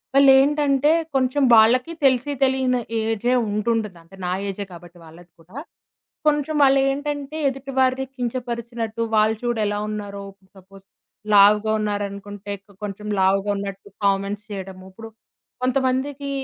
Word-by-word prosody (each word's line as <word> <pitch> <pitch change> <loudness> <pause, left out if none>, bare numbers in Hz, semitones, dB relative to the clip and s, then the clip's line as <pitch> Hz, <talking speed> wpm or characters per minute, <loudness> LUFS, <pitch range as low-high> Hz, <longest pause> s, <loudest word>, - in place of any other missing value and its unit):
వాళ్ళేంటంటే, 275 +1 +5 0.2
కొంచం 265 +2 +1
వాళ్ళకీ 245 +8 +5
తెలిసి 260 +2 +2
తెలియని 260 -2 +1 0.2
ఏజే 225 +2 0
ఉండి 210 +2 -2
ఉంటదీ. 210 -5 -4
అంటే 165 +3 -17
నా 180 - -1 0.2
ఏజే 200 +1 -5
కబ్బటి 175 0 -13
వాళ్ళది 165 +2 -16
కూడా. 170 +8 -19 0.7
కొంచం 300 0 +1
వాళ్ళేంటంటే, 275 +2 +1
ఎదుటి 270 +1 -6
వారిని 260 0 +2
కించపరిచినట్టు 235 -2 -4
వాళ్ళు 215 +1 +3
చూడు 240 -2 -1
ఎలా 205 0 -1
ఉన్నారో 205 -1 -6 0.3
సపోస్ 195 +1 -17 0.5
లావుగావున్నారనుకుంటే, 205 -1 +2
కొ 205 - -20
కొంచం 210 +1 -6
లావుగా 195 +2 +2
ఉన్నట్టు 200 0 -6 0.2
కామెంట్స్ 200 +1 0
చేయటము. 190 -2 -7
ఇప్పుడు 225 +3 -11 0.5
కొంతమందికీ 265 +2 -1
225 Hz, 120 wpm, -22 LUFS, 200-265 Hz, 0.7 s, వాళ్ళేంటంటే